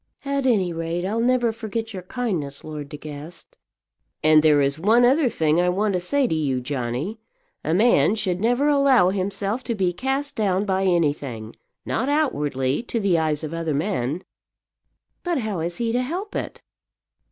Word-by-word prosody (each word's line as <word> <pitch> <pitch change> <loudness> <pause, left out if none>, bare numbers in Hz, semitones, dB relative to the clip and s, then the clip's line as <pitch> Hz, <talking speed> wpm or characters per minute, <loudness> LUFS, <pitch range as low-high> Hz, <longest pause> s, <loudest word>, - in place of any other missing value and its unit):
"At 275 -1 0
any 190 -8 +2
rate 165 +2 -3
I'll 215 +4 -1
never 240 -1 +2
forget 225 0 -5
your 185 - -5
kindness, 180 - -3
Lord 150 -2 -7
De 150 - -7
Guest." 150 +3 -10 0.7
"And 155 0 +6
there 150 -2 +5
is 140 +1 +1
one 225 +7 +4
other 270 +2 +4
thing 160 -3 +2
I 180 - +2
want 200 +3 0
to 180 - +1
say 275 +10 +1
to 240 - 0
you, 140 -5 0
Johnny. 130 - -3 0.4
A 160 - 0
man 205 - +4
should 185 -4 -1
never 245 +6 +2
allow 275 -10 +4
himself 200 +4 -2
to 235 - -1
be 185 -3 0
cast 270 +7 -2
down 200 -2 +1
by 190 -1 0
anything, 145 -10 -1 0.3
not 255 +5 -1
outwardly, 145 - 0
to 240 -1 -3
the 190 -5 +2
eyes 155 -1 -1
of 155 +1 -5
other 165 -3 -2
men." 155 -1 -1 1.0
"But 350 -2 -1
how 215 -7 -2
is 170 +2 -3
he 235 -1 -1
to 245 +2 +1
help 360 +10 -4
it?" - - -5
185 Hz, 175 wpm, -23 LUFS, 155-235 Hz, 1.0 s, And